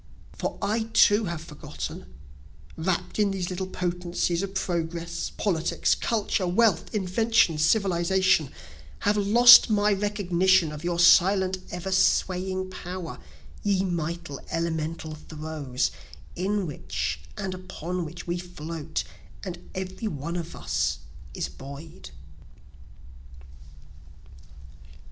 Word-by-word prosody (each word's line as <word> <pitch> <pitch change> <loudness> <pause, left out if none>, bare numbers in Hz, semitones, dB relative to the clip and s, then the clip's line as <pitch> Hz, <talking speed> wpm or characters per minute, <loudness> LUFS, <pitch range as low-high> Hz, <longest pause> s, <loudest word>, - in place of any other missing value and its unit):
For - - -3
I 220 +3 0
too 205 +1 +5
have 170 -3 -4
forgotten, 150 - -7 0.6
(Wrapt 175 +5 -2
in 205 -1 +4
these 190 -2 -3
little 185 +1 -3
potencies 175 -1 -1
of 195 0 -5
progress, 170 -2 -2
politics, 170 -6 +1
culture, 210 -4 0
wealth, 200 +1 +2
inventions, 190 -5 +2
civilization,) 185 -3 +3 0.5
Have 205 +1 +2
lost 235 +5 +8
my 210 -1 +3
recognition 190 -4 +2
of 150 +1 -8
your 175 0 -1
silent 190 +2 +5
ever 180 +2 -5
swaying 185 0 +1
power, 180 -1 -6 0.4
ye 195 -2 +1
mighty, 170 -4 -3
elemental 160 -1 -2
throes, 155 -4 -3 0.4
In 195 +2 -1
which 145 - -3 0.2
and 190 - -3
upon 180 -1 -5
which 170 +2 -8
we 175 0 -2
float, 165 -3 -5 0.4
and 180 -3 -7
every 190 +4 -4
one 165 -1 -4
of 170 -1 -5
us 75 +1 -1 0.4
is - - -2
buoy'd. 140 - -10
180 Hz, 110 wpm, -26 LUFS, 165-190 Hz, 0.6 s, lost